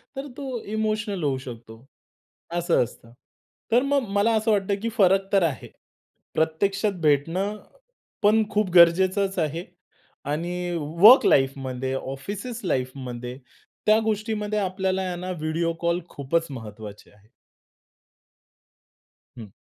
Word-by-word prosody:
तर 270 +2 -5
तो 260 -4 -5
इमोशनल 215 -3 -2
होऊ 140 -3 +1
शकतो. 120 -2 -11 0.7
असं 175 -4 +2
असतं. 115 -1 -11 0.6
तर 240 +2 +5
मग 275 -3 +1
मला 210 +3 +3
असं 220 +1 +1
वाटतं, 200 -1 +1
की 230 - -1
फरक 195 -1 +3
तर 195 -2 +4
आहे. 155 -6 -2 0.7
प्रत्यक्षात 195 +6 +1
भेटणं 165 +8 +1 0.7
पण 215 +2 +5
खूप 210 -2 0
गरजेचच 185 +3 +5
आहे 165 +2 -2 0.7
आणि 175 +3 -3
वर्क 170 - +6
लाईफमध्ये 130 -1 +1
ऑफिसेस 200 - -6
लाईफमध्ये 125 -4 -3 0.5
त्या 215 +1 +5
गोष्टीमध्ये 215 -1 -1
आपल्याला 190 -1 -1
आहे 185 -1 -3
ना 185 0 -4
व्हिडिओ 165 0 -1
कॉल 170 +1 +1
खूपच 165 +4 -1
महत्वाचे 105 -4 -9
आहे. 105 0 -25 2.1
हं. 115 -3 -8
180 Hz, 115 wpm, -24 LUFS, 140-210 Hz, 2.1 s, वर्क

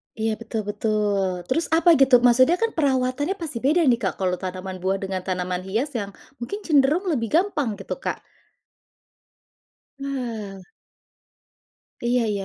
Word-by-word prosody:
Iya, 220 -1 -1
betul 220 -1 -4
betul, 205 -4 0
terus 325 +6 +1
apa, 340 +1 +5
gitu? 260 -3 +6
Maksudnya 255 +6 +5
kan 455 +4 0
perawatannya 275 +2 0
pasti 315 -10 -5
beda 305 +8 +2
nih, 245 -5 +4
Kak, 190 -6 -2
kalau 180 -2 -1
tanaman 185 0 -6
buah 190 +2 -1
dengan 190 -1 -4
tanaman 180 -1 -2
hias 230 +9 -1
yang 200 -1 -5 0.2
mungkin 405 - -5
cenderung 295 +3 +3
lebih 235 -7 0
gampang 310 - +1
gitu, 195 - -6
Kak. - - -4 1.8
Wah. 230 -9 -5 1.4
Iya 240 0 +2
iya. 200 -2 -2
235 Hz, 140 wpm, -23 LUFS, 195-280 Hz, 1.8 s, gitu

